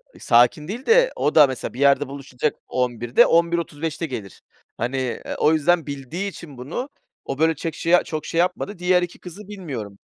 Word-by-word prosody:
a - - -15
sakin 120 +6 +3
değil 235 +7 -6
de - - +5
o 150 - 0
da 150 -2 +8
mesela 130 -2 -5
bir 125 - -9
yerde 140 0 +4
buluşacak 140 0 -3
11.00'de, 120 -1 +2
11.35'te 165 -2 0
gelir. 110 - -7 0.4
Hani, 125 +4 -2
eee, 130 -2 -3
o 155 - +3
yüzden 165 +2 +2
bildiği 145 +8 -4
için 150 -6 -11
bunu 170 - -5 0.4
o 135 - -5
böyle 160 0 +3
çek 160 +2 -5
şey, 175 +1 +4
çok 155 -1 -5
şey 165 - -2
yapmadı. 180 +2 -1
Diğer 180 0 +3
2 175 - -5
kızı 185 +3 -11
bilmiyorum. 135 - -7
155 Hz, 185 wpm, -22 LUFS, 130-175 Hz, 0.4 s, da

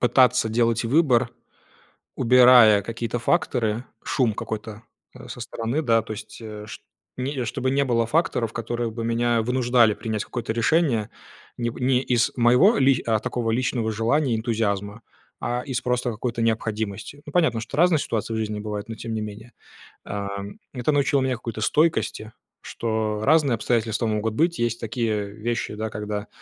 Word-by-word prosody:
пытаться 125 -1 +4
делать 115 0 +1
выбор, 130 -3 +3 0.9
убирая 125 -4 +7
какие-то 115 +2 -4
факторы, 120 -6 0 0.2
шум 120 -5 +1
какой-то, 110 +1 -6 0.3
э, - - -11
со - - -8
стороны, 115 +7 -2
да. 115 -5 +3
То 110 - -9
есть, 110 +1 -10
э, 105 -2 -8
чт - - -9 0.4
не 130 -1 -2
чтобы 130 +4 -2
не 140 +1 +2
было 115 -2 +1
факторов, 120 -7 0
которые 120 +1 -3
бы 115 +1 -5
меня 115 0 +1
вынуждали 120 -2 +3
принять 110 -2 -3
какое-то 120 -2 -4
решение 120 -3 +1 0.5
не 120 -1 -1
не 125 +1 +1
из 120 -3 +1
моего 125 - +5
ли 135 -1 +3
э, 110 -2 +2
такого 115 0 -2
личного 115 -1 0
желания 120 +5 +1
и - - -1
энтузиазма, 110 -2 -2 0.4
а 120 +1 -1
из 130 -2 -2
просто 125 0 0
какой-то 115 +1 -3
необходимости. 110 +3 -2
Ну, 150 - -9
понятно, 155 -11 +2
что 120 +5 -7
разные 170 -2 +4
ситуации 115 -2 -2
в - - -1
жизни 105 -1 -3
бывают, 105 0 -5
но, 115 - -5
тем 115 0 -6
не 110 - -2
менее, 105 +3 -8 0.5
ам, 100 0 -5 0.2
это 125 +4 0
научило 140 -1 +2
меня 130 -1 0
какой-то 115 -2 -6
стойкости, 150 -8 +1 0.3
что 110 -2 -2
разные 150 -4 +4
обстоятельства 115 0 0
могут 110 0 -1
быть. 170 +4 +1
Есть 120 -1 0
такие 110 -3 -2
вещи, 110 +1 -3
да, 110 +1 -3
когда 105 0 -5
115 Hz, 165 wpm, -24 LUFS, 110-125 Hz, 0.9 s, убирая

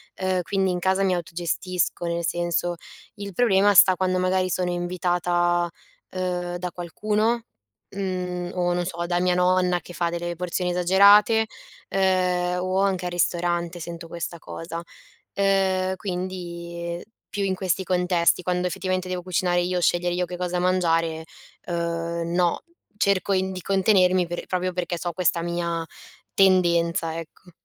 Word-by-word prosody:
ehm, 185 -1 0
quindi 190 +2 0
in 180 - -1
casa 190 +2 +1
mi 185 -2 +2
autogestisco, 175 +1 -2
nel 170 0 -1
senso 175 0 -1 0.4
il 200 -1 -7
problema 205 -2 +4
sta 185 +1 +8
quando 185 0 0
magari 185 0 +1
sono 180 0 0
invitata, 175 0 0 0.4
ehm, 180 -1 -3
da 180 0 -4
qualcuno, 215 +7 -1 0.5
mhmm, 180 -2 -3
o, 175 -1 +1
non 175 0 0
so, 170 -1 -3
da 175 0 0
mia 180 0 +2
nonna, 180 0 +2
che 175 - -12
fa 170 -1 0
delle 175 0 -3
porzioni 180 +1 -2
esagerate, 200 +5 +5 0.4
ehm, 180 -2 +1
o 185 +1 0
anche 190 -2 0
al 180 - -2
ristorante 175 0 0
sento 170 0 -7
questa 170 0 -5
cosa. 165 +1 -7 0.5
Ehm, 190 -1 +1
quindi 175 -2 -5 0.3
più 205 - -2
in 190 -1 0
questi 185 -1 -1
contesti, 180 -1 +2
quando 180 0 0
effettivamente 185 0 -2
devo 180 -1 -2
cucinare 180 0 +1
io, 180 +1 0
scegliere 175 0 +2
io 180 0 0
che 180 - -7
cosa 180 0 -2
mangiare, 165 -3 +1 0.4
uhm, 170 0 -2
no. 175 -1 +2 0.4
Cerco 200 -1 +1
in 190 0 0
di 185 - -6
contenermi 185 -2 +3
per 175 +1 -5
proprio 185 0 -1
perché 175 -1 -2
so 175 +1 -3
questa 175 -1 +1
mia 170 -1 -2 0.5
tendenza, 170 -3 +3
ecco. 165 +2 -12
180 Hz, 150 wpm, -24 LUFS, 175-185 Hz, 0.5 s, sta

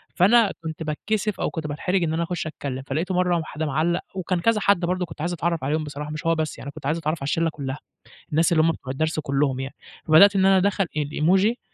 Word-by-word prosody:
فأنا 210 +3 +5
كنت 160 0 -5
باتكسف 205 +7 -2
أو - - 0
كنت 160 -2 -5
باتحرج 180 +5 -1
إن 160 -1 0
أنا 165 +1 0
اخش 170 -1 -3
اتكلم، 140 -4 -5
فلقيته 170 +7 -2
مرّة 180 -1 +2
واحد 160 -1 -4
معلّق 155 +4 0
وكان 185 -1 -1
كذا 225 +4 +2
حد 200 -2 +3
برضه 180 +1 -1
كنت 160 - -10
عايز 175 +2 -1
اتعرّف 170 -2 -1
عليهم 155 +3 0
بصراحة 150 0 -6
مش 155 +1 -6
هو 165 0 +3
بس 155 -1 -3
يعني 140 - -7
كنت 150 -1 -11
عايز 150 +4 +1
اتعرّف 160 0 -2
على - - -3
الشلة 165 +3 +1
كلّها، 140 -3 -5 0.5
الناس 160 +3 +3
اللي 160 -2 +4
هُم 165 - +4
بتوع 130 -4 -7
الدرس 155 +3 -1
كلّهم 140 -2 0
يعني. 135 +1 -6 0.3
فبدأت 195 +6 +7
إن 190 -1 +3
أنا 195 0 +6
ادخل 195 +1 +2
الإيموجي 180 - +2
160 Hz, 230 wpm, -24 LUFS, 150-180 Hz, 0.5 s, فبدأت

